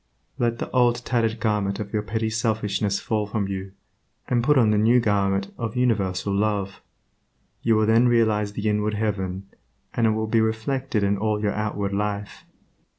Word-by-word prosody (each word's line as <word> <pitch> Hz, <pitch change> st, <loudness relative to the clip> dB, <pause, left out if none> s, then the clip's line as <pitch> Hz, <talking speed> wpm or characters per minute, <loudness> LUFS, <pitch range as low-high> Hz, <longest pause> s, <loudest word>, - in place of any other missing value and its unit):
Let 115 Hz, -1 st, +1 dB
the -, -, -5 dB
old 120 Hz, -1 st, +2 dB
tattered 115 Hz, -2 st, 0 dB
garment 105 Hz, -3 st, 0 dB
of 105 Hz, 0 st, -6 dB
your 105 Hz, -, +1 dB
petty 110 Hz, +1 st, -2 dB
selfishness 105 Hz, -3 st, 0 dB
fall 105 Hz, -2 st, -1 dB
from 105 Hz, -1 st, -2 dB
you, 95 Hz, 0 st, -5 dB, 0.5 s
and 120 Hz, -1 st, +1 dB
put 150 Hz, +2 st, +4 dB
on 115 Hz, -4 st, +4 dB
the 105 Hz, -, +2 dB
new 115 Hz, +4 st, +5 dB
garment 100 Hz, -3 st, 0 dB
of 115 Hz, -1 st, -3 dB
universal 100 Hz, -6 st, 0 dB
Love. 100 Hz, -1 st, -1 dB, 0.8 s
You 115 Hz, -1 st, +3 dB
will 110 Hz, 0 st, +3 dB
then 115 Hz, +3 st, +4 dB
realize 110 Hz, -3 st, +2 dB
the 105 Hz, +1 st, -3 dB
inward 105 Hz, 0 st, 0 dB
heaven, 95 Hz, -3 st, -2 dB, 0.5 s
and 115 Hz, -1 st, +2 dB
it -, -, +3 dB
will 110 Hz, 0 st, -1 dB
be 110 Hz, +1 st, +2 dB
reflected 110 Hz, +1 st, -1 dB
in 100 Hz, 0 st, +1 dB
all 105 Hz, 0 st, 0 dB
your 105 Hz, -1 st, 0 dB
outward 105 Hz, -2 st, -2 dB
life. 105 Hz, 0 st, -3 dB
105 Hz, 175 wpm, -24 LUFS, 100-115 Hz, 0.8 s, new